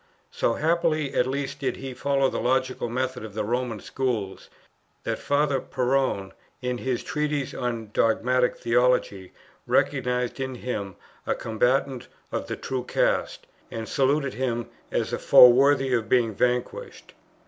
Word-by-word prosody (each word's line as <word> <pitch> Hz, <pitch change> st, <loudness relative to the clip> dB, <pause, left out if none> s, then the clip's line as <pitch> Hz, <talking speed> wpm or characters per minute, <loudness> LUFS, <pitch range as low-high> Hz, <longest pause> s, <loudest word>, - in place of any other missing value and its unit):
So 485 Hz, +1 st, 0 dB
happily 160 Hz, -3 st, +1 dB
at 125 Hz, -, +2 dB
least 135 Hz, +1 st, -3 dB
did 135 Hz, -, -1 dB
he 135 Hz, -1 st, -7 dB
follow 135 Hz, +1 st, +1 dB
the -, -, -3 dB
logical 130 Hz, -1 st, 0 dB
method 130 Hz, 0 st, -2 dB
of 105 Hz, -2 st, -9 dB
the 110 Hz, -, -1 dB
Roman 120 Hz, 0 st, -2 dB
Schools, 115 Hz, -6 st, -3 dB, 0.5 s
that -, -, -2 dB
Father 145 Hz, -1 st, +1 dB
Perrone 125 Hz, -7 st, -1 dB, 0.3 s
in 125 Hz, -1 st, -3 dB
his 130 Hz, -2 st, -2 dB
Treatise 150 Hz, -2 st, -2 dB
on 115 Hz, -4 st, -4 dB
dogmatic 125 Hz, +2 st, +2 dB
theology, 120 Hz, -6 st, +1 dB, 0.4 s
recognized 125 Hz, +1 st, 0 dB
in 130 Hz, -1 st, -3 dB
him 105 Hz, -6 st, -4 dB, 0.3 s
a -, -, +1 dB
combatant 125 Hz, +3 st, 0 dB, 0.2 s
of -, -, -3 dB
the -, -, -3 dB
true 130 Hz, -1 st, -3 dB
cast, -, -, 0 dB, 0.2 s
and 115 Hz, -1 st, -5 dB
saluted 140 Hz, 0 st, +1 dB
him 120 Hz, -2 st, -2 dB, 0.2 s
as -, -, -1 dB
a -, -, -1 dB
foe 125 Hz, -, +9 dB
worthy 135 Hz, +1 st, +3 dB
of 110 Hz, -3 st, 0 dB
being 120 Hz, -3 st, +3 dB
vanquished. 125 Hz, -, -2 dB
125 Hz, 145 wpm, -25 LUFS, 120-135 Hz, 0.5 s, foe